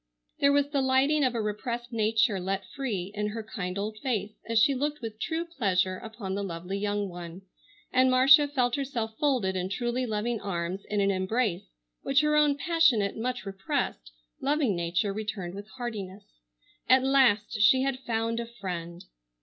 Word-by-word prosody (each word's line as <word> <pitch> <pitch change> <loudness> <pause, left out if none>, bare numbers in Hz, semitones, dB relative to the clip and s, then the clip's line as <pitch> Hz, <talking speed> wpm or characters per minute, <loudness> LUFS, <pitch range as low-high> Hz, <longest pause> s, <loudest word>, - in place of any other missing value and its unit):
There 280 - +5
was 285 0 +3
the 280 -2 +1
lighting 270 +3 +3
of 255 -2 +1
a 230 - 0
repressed 235 +3 -4
nature 220 -1 +2
let 190 +1 -2
free 200 -6 -4
in 210 0 -2
her 220 +1 -5
kind 195 -4 -5
old 215 +2 -4
face 215 -6 -2 0.2
as 230 - +1
she 235 +6 +5
looked 295 +3 -2
with 220 -2 -7
true 330 +5 -2
pleasure 190 - 0
upon 220 -4 -6
the 200 - -2
lovely 180 +1 -4
young 205 0 -1
one, 175 0 -9 0.5
and 255 0 +5
Marcia 275 +4 +7
felt 250 -4 0
herself 240 -5 -3
folded 250 -10 +1
in 185 0 -2
truly 240 +4 -1
loving 220 +1 -2
arms 180 0 -3
in 210 -1 +1
an 200 0 +3
embrace 190 0 -1 0.3
which 275 +1 +3
her 300 0 +2
own 295 -1 +4
passionate, 285 - +2
much 245 -2 -3
repressed, 125 - -3 0.3
loving 280 -7 +1
nature 175 +4 0
returned 205 -4 -4
with 200 +1 -8
heartiness. 205 -5 -5 0.7
At 260 0 +6
last 245 -5 +3
she 260 +5 +6
had 270 -1 -1
found 230 -2 -1
a 235 - -4
friend! 180 -6 -6
220 Hz, 175 wpm, -28 LUFS, 195-260 Hz, 0.7 s, Marcia